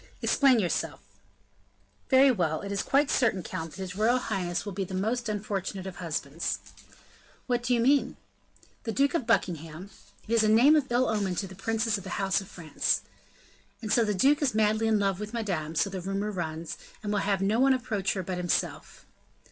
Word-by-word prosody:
"Explain 270 -3 +4
yourself." 185 -6 -1 1.1
"Very 265 0 +6
well; 165 -8 0
it 200 - -6
is 200 - 0
quite 280 +1 +2
certain, 220 -8 +2
count, 165 +1 -5
that - - -11
his 185 -1 -5
royal 225 +5 +3
highness 190 -8 -2
will 205 - -5
be 195 +1 -2
the 190 0 -6
most 225 +4 -1
unfortunate 200 -2 -3
of 190 -2 -7
husbands." 160 -2 -3 0.9
"What 245 -1 0
do 245 +1 +1
you - - +1
mean?" 270 +4 +2 0.7
"The 225 - -3
Duke 280 +3 +2
of 275 -9 -1
Buckingham 175 -3 -1 0.2
" - - -27
"It 230 - -2
is 230 -1 +4
a 215 - +3
name 245 +8 +6
of 275 -5 +1
ill 245 +2 +3
omen 200 -4 0
to 195 - -2
the 190 - -10
princes 220 +2 -1
of - - -11
the - - -5
house 195 0 +1
of 195 - -11
France." 160 -6 -1 0.8
"And 215 -1 -1
so 235 - +4
the 210 -2 0
duke 280 +10 +3
is 265 -6 +1
madly 215 +1 +2
in 220 -1 +3
love 195 -2 0
with 210 +2 -6
Madame, 175 -9 -3
so 160 - +2
the 190 -2 -5
rumor 195 +3 -2
runs, 165 -3 -5 0.2
and 210 0 -2
will 205 - +1
have 195 -1 0
no 210 +4 +2
one 265 0 +5
approach 220 -6 -1
her 190 - -3
but 180 0 -4
himself." 175 -1 -2
205 Hz, 205 wpm, -28 LUFS, 185-235 Hz, 1.1 s, Very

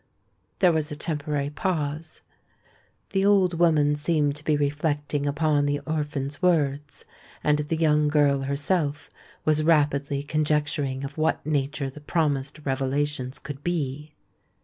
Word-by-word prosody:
There 180 -3 +5
was 160 -2 0
a - - -3
temporary 150 -2 -2
pause:—the 160 +4 -5
old 190 -4 +3
woman 150 -4 +4
seemed 145 -1 +1
to 150 - -12
be 155 -1 +2
reflecting 145 0 -1
upon 145 0 +1
the 145 0 0
orphan's 145 -2 -3
words; 145 -5 0 0.4
and 150 0 +3
the 150 +2 -1
young 150 -2 +3
girl 145 -2 +3
herself 145 +2 -1 0.3
was 155 0 +3
rapidly 145 -3 +2
conjecturing 145 -3 0
of 140 +3 -6
what 155 - 0
nature 145 -1 -1
the 150 - -12
promised 145 -2 -1
revelations 135 0 -1
could 145 0 -8
be. 150 -3 -3
150 Hz, 125 wpm, -25 LUFS, 145-155 Hz, 0.4 s, There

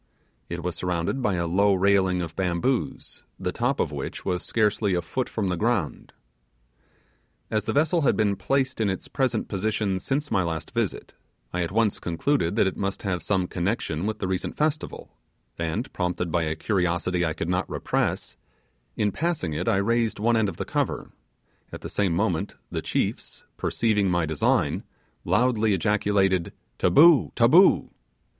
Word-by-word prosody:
It 85 0 -5
was 90 -1 -2
surrounded 90 +8 -2
by 105 -6 +1
a 85 -1 -1
low 100 +4 +3
railing 95 -1 +2
of 80 -1 -7
bamboos, 95 +8 -1 0.2
the - - -2
top - - -1
of - - 0
which - - -6
was 90 -1 -1
scarcely 105 -3 +1
a 90 - 0
foot 125 +9 -3
from 100 -4 -2
the 90 - 0
ground. 105 -5 -1 1.4
As 110 -1 0
the - - -1
vessel 160 +4 +2
had 140 - +3
been 100 -2 +2
placed 130 +1 0
in 105 - +2
its 95 - -4
present 130 -5 -1
position 105 -1 -1
since 145 +8 -2
my 100 -4 +3
last 80 -3 -3
visit, - - -2 0.4
I 90 - 0
at 85 - -2
once 110 0 +1
concluded 85 - 0
that 115 - +3
it 95 - -2
must 100 0 -3
have 90 -3 -1
some 95 -3 0
connection 90 -2 -2
with 110 -1 -2
the 100 - -3
recent 95 -1 -3
festival, 155 0 -2 0.5
and, 85 +9 -3
prompted 90 -1 -2
by 85 -1 +1
a 80 0 -1
curiosity 90 -1 0
I 80 -2 0
could 80 - -4
not 90 +1 -1
repress, - - -1 0.6
in 105 -1 +1
passing 155 - -2
it 85 +4 -3
I - - +3
raised 115 +3 +1
one 115 +3 +2
end 110 -3 +2
of - - -8
the - - -3
cover; - - -2 0.6
at - - -8
the - - -6
same 95 -4 +1
moment 95 -1 -1 0.2
the - - -2
chiefs, - - -3
perceiving 105 -4 +1
my 85 -2 +1
design, 80 -2 +1 0.4
loudly 110 +2 +2
ejaculated, 95 -2 +1 0.3
'Taboo! 160 0 +6
taboo! 155 +11 +5
100 Hz, 170 wpm, -25 LUFS, 90-115 Hz, 1.4 s, Taboo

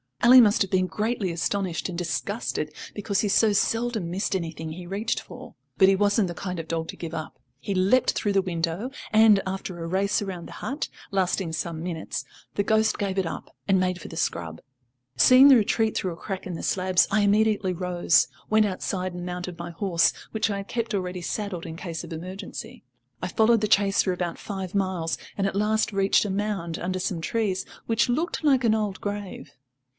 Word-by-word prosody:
Ally 250 +2 +9
must 215 -3 +5
have 195 - -7
been 185 -1 +2
greatly 215 -2 -1
astonished 175 +1 -1
and 175 - -5
disgusted, 150 -4 -2 0.2
because 200 -1 -1
he 210 - 0
so 210 +1 +4
seldom 225 -3 0
missed 190 +2 -1
anything 160 -3 -4
he 175 +2 -8
reached 205 +5 -1
for. - - -11 0.2
But 190 -1 +6
he 195 - +5
wasn't 205 +1 +2
the 175 - -4
kind 180 0 -5
of 165 - -6
dog 165 0 -2
to - - -7
give 165 -1 -7
up. 160 -1 -6 0.2
He 200 - -3
leapt 195 +8 +3
through 205 - -1
the 195 - +4
window, 175 +5 -2 0.2
and, 215 -2 +6
after 190 -2 -5
a - - -4
race 195 +4 +1
round 185 -4 -5
the - - -10
hut, 280 +3 -4 0.2
lasting 185 -3 0
some 165 0 -3
minutes, 170 -2 -4 0.3
the 200 - +1
ghost 220 +1 +2
gave 195 -2 -2
it 190 - 0
up, - - -7
and 195 -2 +4
made 185 -1 0
for - - -8
the 165 - -9
scrub. 85 - -2 0.6
Seeing 255 - +8
the 270 - +9
retreat 220 0 +2
through 185 -2 -1
a - - -12
crack 190 0 -5
in 180 - -4
the 165 - -6
slabs, 185 -1 +2
I 210 +1 +3
immediately 205 -2 +2
rose, 175 -4 +2 0.2
went 215 0 +4
outside 185 -1 -3
and 175 0 -6
mounted 180 -1 -5
my 170 0 -5
horse, 170 -1 +2 0.2
which 220 0 0
I 200 - -1
had 200 0 -6
kept 230 -1 -3
ready 180 -2 -2
saddled 190 -1 -4
in 160 -1 -6
case 165 -2 -5
of - - -7
emergency. 185 +4 -7 0.4
I - - -2
followed 225 0 +3
the 215 - +1
chase 200 -1 +3
for 185 - 0
about 175 -1 -3
five 190 -3 -5
miles, 185 -4 -1 0.2
and 195 - 0
at 195 - -1
last 215 +2 +1
reached 195 +1 +3
a 205 - -2
mound 195 -5 -2
under 185 +1 -2
some 180 -2 -2
trees, 200 -1 -1 0.2
which 230 +2 +1
looked 315 +7 -1
like 270 -4 +4
an 225 -2 +4
old 210 -3 -1
grave. 205 -7 -5
190 Hz, 205 wpm, -25 LUFS, 175-210 Hz, 0.6 s, Ally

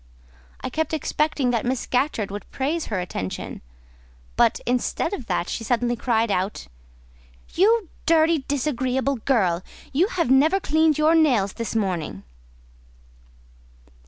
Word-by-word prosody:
I - - -4
kept 315 +3 -1
expecting 300 -3 0
that 235 -2 0
Miss 250 0 -1
Scatcherd 250 -6 -1
would 205 0 -7
praise 300 +5 -2
her 210 -4 -2
attention; 95 - -5 0.7
but, 235 -2 +3
instead 250 +10 -1
of 260 - -5
that, 175 -1 -1
she 230 - -4
suddenly 240 +1 0
cried 230 -2 0
out— 190 +2 -2 0.9
"You 425 +2 +3 0.2
dirty, 325 0 +4
disagreeable 265 -1 0
girl! 200 -8 +1 0.3
you 335 +8 +3
have 340 - -1
never 310 +9 +4
cleaned 315 -2 +2
your 305 +1 +4
nails 250 -12 +3
this 230 -1 -5
morning!" 180 - -2
255 Hz, 130 wpm, -23 LUFS, 220-310 Hz, 0.9 s, dirty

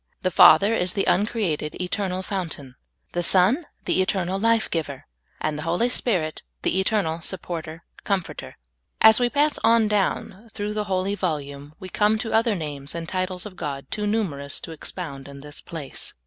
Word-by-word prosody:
The 185 - +1
Father 200 +4 +7
is 180 -4 0
the 195 - 0
uncreated, 190 -7 0
eternal 185 0 -2
Fountain; 165 -10 -4 0.4
the 175 - -1
Son, 195 - +3 0.2
the - - +2
eternal 185 0 0
lyife 230 +1 +3
giver; 145 -5 -3 0.3
and 155 -1 -2
the - - -4
Hoi 165 +2 0
3^ 240 +4 +2
Spirit, 175 -12 0 0.2
the 190 - +1
eternal 190 -5 0
Supporter, 165 -2 -6 0.2
Comforter. 195 -4 -3 0.4
As 220 +1 +8
we 245 -1 +2
pass 295 +3 +2
on 230 -1 +5
down 210 +1 -1
through 205 +1 -3
the 210 0 -1
holy 190 0 0
volume, 145 -6 -4
we 185 - -7
come 210 +3 +2
to 225 +1 -3
other 225 -1 +3
names 145 -4 -5
and 165 -1 -4
titles 185 +1 -2
of 205 -3 -8
God 140 -5 -5
too 210 -1 -1
numerous 155 -10 -1
to - - -8
expound 150 -3 -6
in 140 0 -10
this 145 +1 -10
place. 155 -5 -8
185 Hz, 175 wpm, -24 LUFS, 155-210 Hz, 0.4 s, As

